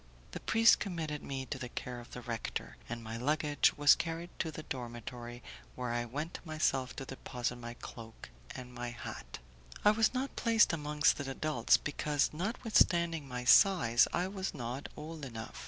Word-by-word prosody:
The - - -5
priest 225 +1 +5
committed 160 -6 -3
me 135 -1 -4
to 135 - -5
the 125 - -5
care 125 0 -5
of 120 - -12
the 125 - -8
rector, 115 -2 -4
and 120 0 -5
my 115 +1 -5
luggage 145 +3 +2
was 145 0 +8
carried 165 +1 -3
to 165 - 0
the 155 0 -7
dormitory, 120 -1 -7 0.3
where 125 -2 -3
I 120 0 -1
went 150 +8 -5
myself 155 -5 0
to 135 - -5
deposit 125 -2 -4
my 120 0 -7
cloak 115 - -10 0.2
and 125 -1 -8
my 120 0 -4
hat. 120 - -7 0.5
I 210 - +8
was 220 0 +3
not 265 +2 -3
placed 225 -6 +4
amongst 150 -1 +2
the 140 -2 -4
adults, 135 -3 +3
because, 145 0 0
notwithstanding 170 - +2
my 125 -1 -4
size, 120 - +6
I 180 - 0
was 190 -1 -4
not 125 +3 -5
old 155 0 -7
enough. 115 -4 -7
140 Hz, 170 wpm, -33 LUFS, 120-165 Hz, 0.5 s, was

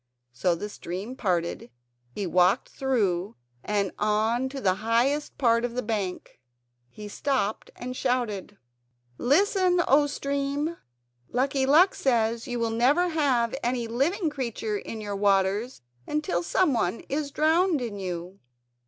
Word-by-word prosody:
So 170 +8 +1
the 205 +5 -5
stream 205 +4 -6
parted; 175 - -1 0.4
he 195 +11 -4
walked 180 +6 +3
through 210 -8 -1 0.3
and 200 -2 0
on 220 +5 +1
to 270 0 -6
the 190 -7 +2
highest 245 +7 +1
part 230 -3 +3
of 245 -1 -3
the 250 - -1
bank. 205 - -4 0.5
He 210 +11 -9
stopped 220 -1 -1
and 255 +1 -6
shouted 240 -7 -1
out: - - -30 0.6
"Listen, 365 - +3
oh 290 +2 +5
stream! 280 +3 -2 0.5
Lucky 265 +2 0
Luck 335 +7 +6
says 230 -1 0
you 245 -1 -3
will 230 -1 0
never 280 +10 +3
have 265 -8 +1
any 240 -1 -1
living 300 - 0
creature 235 -6 -3
in 220 - -7
your 205 -1 -4
waters 200 - +1 0.2
until 300 -13 -1
someone 230 - +1
is 290 0 -3
drowned 320 +3 +2
in 225 -5 -5
you." 180 0 -5
235 Hz, 135 wpm, -26 LUFS, 205-280 Hz, 0.6 s, Luck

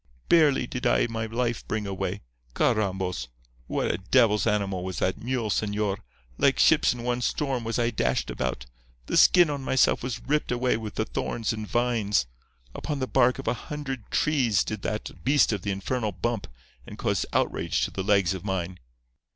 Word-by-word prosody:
Barely 155 -6 +4
did 125 +1 -2
I - - +3
my 115 -1 -3
life 120 0 -2
bring 110 -1 -2
away. 95 0 -3 0.3
Carrambos! 95 - 0 0.4
what - - 0
a - - -3
devil's 105 +2 +3
animal 100 -4 0
was 95 -1 -5
that 95 - -1
mule, 120 -3 -1
señor! 105 0 0 0.4
Like - - +4
ships - - +5
in 120 -1 -5
one 125 0 -1
storm 135 -1 -1
was 115 0 -2
I 120 -1 +1
dashed - - 0
about. 60 -1 -3 0.4
The - - -3
skin 175 -4 +6
on 140 -1 -3
myself 130 -1 +2
was 125 -1 -3
ripped 150 0 0
away 125 +1 +1
with 110 -2 -6
the - - 0
thorns 115 -1 -2
and 110 -1 -5
vines. 115 - +1 0.5
Upon 150 - -4
the 130 - -1
bark 125 -1 +3
of 135 - -8
a - - +2
hundred 135 -2 -6
trees 130 - +2
did 110 - -5
that 105 - -5
beast 140 -4 +4
of 100 - -3
the 100 - -4
infernal 105 +2 -2
bump, 110 +2 -2 0.4
and - - -9
cause - - 0
outrage - - 0
to - - -6
the 95 - -4
legs 100 -2 +2
of 95 - -6
mine. 95 -2 -3
110 Hz, 185 wpm, -26 LUFS, 100-125 Hz, 0.5 s, skin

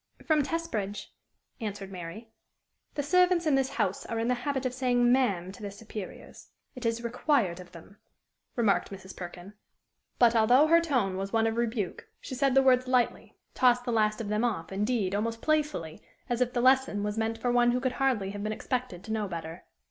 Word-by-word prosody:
"From 310 -2 +3
Testbridge," 270 - -3 0.5
answered 205 -3 -5
Mary. 190 +5 -8 0.6
"The 290 - -1
servants 360 +3 +3
in 305 - +3
this 270 -1 +2
house 200 -8 -1
are 230 - -3
in 230 +1 0
the - - +3
habit 265 +2 -2
of 255 - -1
saying 245 -1 +2
ma'am 200 -9 +1
to 200 - -13
their 205 - -4
superiors: 205 -1 -9 0.3
it 250 -2 -3
is 230 +1 -2
required 235 - 0
of 180 -1 -12
them," 175 +4 -14 0.6
remarked 220 -5 +2
Mrs. 190 -1 -10
Perkin. 180 +2 -9 0.6
But, 235 -1 +5
although 245 +6 +5
her 335 +2 +5
tone 245 - 0
was 195 +1 -4
one 225 -1 +2
of 225 0 0
rebuke, 230 -5 -2
she - - -8
said 270 0 +1
the 270 - +6
words 255 -1 +4
lightly, 250 -2 0 0.2
tossed 245 -1 +3
the 245 - -1
last 215 -1 +1
of 220 -3 -4
them 210 +2 0
off, 205 -9 -2
indeed, 205 -1 0
almost 225 +3 -1
playfully, 295 - -1 0.3
as 245 -1 -1
if 250 -1 +2
the 240 - 0
lesson 260 -5 +3
was 210 0 -2
meant 225 0 -1
for 245 +2 -1
one 240 0 +4
who 245 +1 +1
could 260 0 0
hardly 225 -8 +1
have 205 0 -6
been 215 +1 -2
expected 245 -5 -3
to 220 - -4
know 215 -2 -1
better. 165 -1 -7
230 Hz, 200 wpm, -28 LUFS, 200-255 Hz, 0.6 s, the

